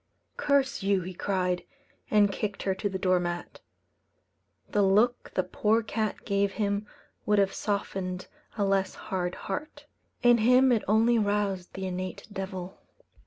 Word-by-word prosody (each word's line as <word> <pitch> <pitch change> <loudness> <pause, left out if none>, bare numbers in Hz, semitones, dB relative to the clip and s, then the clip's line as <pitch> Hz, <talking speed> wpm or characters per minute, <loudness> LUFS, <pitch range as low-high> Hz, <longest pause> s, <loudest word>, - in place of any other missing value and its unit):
"Curse 280 -2 +1
you!" 195 -1 +2
he 185 +1 -6
cried, 180 -1 -1 0.5
and 205 -1 +4
kicked 205 0 -3
her 190 - +1
to 200 +2 -2
the 190 - -3
door 185 -1 +2
mat. 175 0 -4 1.1
The 210 - +2
look 210 +5 +3
the 185 - +2
poor 215 +5 +1
cat 215 0 -3
gave 200 -1 +1
him 205 0 -1 0.4
would 210 0 +4
have 195 -1 +3
softened 190 -3 -3 0.3
a 205 - +2
less 195 -1 +1
hard 180 -2 -3
heart; 290 +7 -5 0.4
in 240 -1 +6
him 250 +3 +5
it 230 -3 +3
only 225 +3 +4
roused 205 -3 -1
the 190 0 -4
innate 185 0 -5
devil. 190 -1 -6
200 Hz, 150 wpm, -28 LUFS, 185-215 Hz, 1.1 s, in